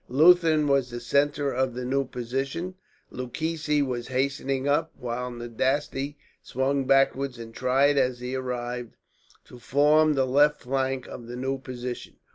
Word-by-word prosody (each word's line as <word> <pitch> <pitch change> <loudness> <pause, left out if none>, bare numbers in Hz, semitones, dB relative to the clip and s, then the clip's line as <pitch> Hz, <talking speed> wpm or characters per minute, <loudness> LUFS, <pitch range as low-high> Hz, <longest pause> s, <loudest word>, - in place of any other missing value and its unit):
Leuthen 155 +2 +5
was 140 -3 +2
the 120 0 -5
centre 140 +3 +1
of 130 -1 -1
the 125 0 -4
new 135 +2 +1
position. 135 +9 -3 0.4
Lucchesi 150 +3 -1
was 120 -2 -4
hastening 135 +1 -1
up, 155 +3 +1
while 125 +1 -4
Nadasti 130 +4 -2 0.3
swung 135 +1 -1
backwards 135 -1 +2
and 115 -1 -9
tried, 135 +3 +3
as 125 -2 +1
he 125 +1 -5
arrived, 125 -2 -4 0.5
to 125 - -13
form 150 +4 +4
the 135 -1 +2
left 145 +3 +3
flank 130 0 -1
of 120 - -9
the 120 - -6
new 135 +2 -2
position. 125 -1 -6
135 Hz, 145 wpm, -26 LUFS, 125-145 Hz, 0.5 s, Leuthen